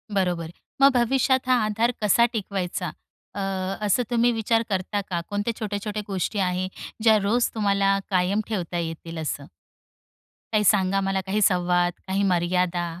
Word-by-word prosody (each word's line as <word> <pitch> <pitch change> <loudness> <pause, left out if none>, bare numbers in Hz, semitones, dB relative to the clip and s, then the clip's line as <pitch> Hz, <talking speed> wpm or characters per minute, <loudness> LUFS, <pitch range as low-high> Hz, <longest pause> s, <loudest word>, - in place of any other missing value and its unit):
बरोबर. 175 -4 0 0.3
मग 275 +1 +8
भविष्यात 260 +1 +2
हां 255 - +5
आधार 225 +3 +1
कसा 210 +3 +5
टिकवायचा 195 -4 -3 0.4
अ, - - -4 0.5
असं 210 +5 +2
तुम्ही 240 0 +3
विचार 225 +1 +1
करता 195 +1 -1
का? 175 - -1
कोणत्या 205 +3 -1
छोट्या-छोट्या 210 0 -3
गोष्टी 195 +1 -2
आहे, 185 -1 0 0.4
ज्या 220 -2 +6
रोज 235 +4 +2
तुम्हाला 200 -2 +2
कायम 185 +3 +2
ठेवता 180 -5 -3
येतील 165 0 -5
असं? 145 -2 -4 1.1
काही 215 -1 +2
सांगा 195 -1 +3
मला, 195 0 0
काही 205 +3 0
संवाद, 175 -2 +2
काही 195 +1 0
मर्यादा? 180 -1 +1
195 Hz, 145 wpm, -24 LUFS, 180-215 Hz, 1.1 s, मग